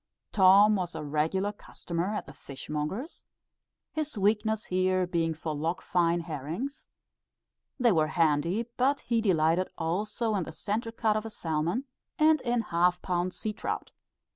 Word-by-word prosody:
Tom 200 Hz, +2 st, +6 dB
was 180 Hz, -1 st, -3 dB
a -, -, -4 dB
regular 160 Hz, +7 st, 0 dB
customer 180 Hz, -1 st, -4 dB
at -, -, -3 dB
the 140 Hz, -, -11 dB
fish 140 Hz, +1 st, -10 dB
monger's; 170 Hz, -, -4 dB, 0.6 s
his 305 Hz, -6 st, -3 dB
weakness 215 Hz, +2 st, +1 dB
here 185 Hz, 0 st, +1 dB
being 165 Hz, -2 st, 0 dB
for 155 Hz, 0 st, -4 dB
Loch 160 Hz, +5 st, -2 dB
Fyne 170 Hz, -1 st, +1 dB
herrings, 165 Hz, -, -5 dB, 0.9 s
they 245 Hz, -2 st, +5 dB
were 160 Hz, -4 st, +3 dB
handy; 165 Hz, +6 st, +1 dB
but 275 Hz, +3 st, +2 dB
he 230 Hz, -2 st, 0 dB
delighted 175 Hz, -2 st, +2 dB
also 210 Hz, +7 st, -1 dB
in 200 Hz, -, +1 dB
the 165 Hz, -, -5 dB
centre 220 Hz, +6 st, -3 dB
cut 225 Hz, -2 st, +1 dB
of 215 Hz, -, -1 dB
a 225 Hz, -, -6 dB
salmon, 170 Hz, -, -2 dB, 0.3 s
and 310 Hz, -1 st, +4 dB
in 240 Hz, -1 st, +1 dB
half 180 Hz, -2 st, +2 dB
pound 180 Hz, 0 st, 0 dB
sea 215 Hz, +3 st, -4 dB
trout. -, -, -4 dB
185 Hz, 155 wpm, -29 LUFS, 165-220 Hz, 0.9 s, Tom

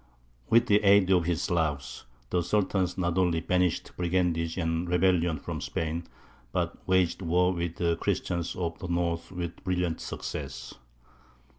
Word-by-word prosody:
With 115 Hz, +1 st, +5 dB
the 105 Hz, 0 st, +3 dB
aid 100 Hz, -1 st, +5 dB
of 90 Hz, -3 st, +4 dB
his 85 Hz, -1 st, 0 dB
"Slavs," 75 Hz, -6 st, -1 dB, 0.3 s
the 90 Hz, -, +2 dB
Sultan 95 Hz, 0 st, +1 dB
not 85 Hz, -1 st, 0 dB
only 90 Hz, -3 st, +2 dB
banished 90 Hz, 0 st, 0 dB
brigandage 85 Hz, -2 st, 0 dB
and 85 Hz, 0 st, -1 dB
rebellion 90 Hz, -2 st, +2 dB
from -, -, -5 dB
Spain, 80 Hz, +1 st, -3 dB, 0.5 s
but -, -, -1 dB
waged 95 Hz, -1 st, +2 dB
war 90 Hz, +1 st, +2 dB
with 85 Hz, -1 st, -3 dB
the 85 Hz, -1 st, 0 dB
Christians 85 Hz, 0 st, -1 dB
of 85 Hz, -2 st, -3 dB
the 90 Hz, -, -5 dB
north 85 Hz, -1 st, -1 dB
with 90 Hz, -2 st, -5 dB
brilliant 90 Hz, -3 st, -1 dB
success. -, -, -6 dB
85 Hz, 145 wpm, -28 LUFS, 85-90 Hz, 0.5 s, With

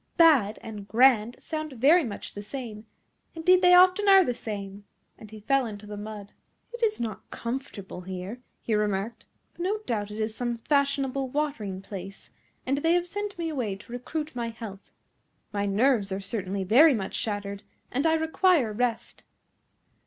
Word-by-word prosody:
BAD 275 Hz, -11 st, +5 dB
and 210 Hz, -3 st, -8 dB
GRAND 235 Hz, 0 st, +4 dB
sound 310 Hz, -2 st, -5 dB
very 290 Hz, +8 st, +5 dB
much 220 Hz, -6 st, -6 dB
the 205 Hz, -, -6 dB
same, 220 Hz, -1 st, -7 dB, 0.5 s
indeed 360 Hz, +3 st, +4 dB
they 360 Hz, -1 st, +7 dB
often 370 Hz, +3 st, +6 dB
are 385 Hz, -1 st, +8 dB
the 250 Hz, -, -1 dB
same;" 200 Hz, -3 st, -6 dB, 0.3 s
and 215 Hz, -, -13 dB
he 215 Hz, 0 st, -10 dB
fell 265 Hz, +4 st, +1 dB
into 210 Hz, -1 st, -8 dB
the 210 Hz, 0 st, -7 dB
mud. 205 Hz, -1 st, -8 dB, 0.4 s
"It 475 Hz, -, -7 dB
is 435 Hz, -2 st, +1 dB
not 220 Hz, -5 st, -5 dB
comfortable 235 Hz, -7 st, -6 dB
here," 185 Hz, +5 st, -6 dB, 0.2 s
he 225 Hz, -, -1 dB
remarked, 210 Hz, +1 st, -1 dB, 0.3 s
"but -, -, -10 dB
no 390 Hz, +4 st, 0 dB
doubt 210 Hz, -3 st, -2 dB
it 210 Hz, -, -7 dB
is 215 Hz, 0 st, -1 dB
some 240 Hz, 0 st, -2 dB
fashionable 275 Hz, 0 st, 0 dB
watering 250 Hz, -10 st, -3 dB
place, 195 Hz, -1 st, -9 dB, 0.3 s
and 275 Hz, +2 st, 0 dB
they 330 Hz, +3 st, +2 dB
have 350 Hz, 0 st, +2 dB
sent 410 Hz, +2 st, -5 dB
me 335 Hz, -1 st, -2 dB
away 245 Hz, -10 st, -2 dB
to 205 Hz, +4 st, -15 dB
recruit 300 Hz, +5 st, -5 dB
my 235 Hz, -1 st, -2 dB
health. 220 Hz, -3 st, -9 dB, 0.6 s
My 200 Hz, 0 st, 0 dB
nerves 210 Hz, 0 st, +2 dB
are 190 Hz, -, -2 dB
certainly 195 Hz, -1 st, -3 dB
very 260 Hz, -, +6 dB
much 195 Hz, -4 st, -4 dB
shattered, 200 Hz, -2 st, -3 dB, 0.3 s
and 275 Hz, +6 st, +1 dB
I 320 Hz, -, +4 dB
require 320 Hz, -, +2 dB
rest." 235 Hz, +1 st, -2 dB
235 Hz, 170 wpm, -27 LUFS, 205-300 Hz, 0.6 s, are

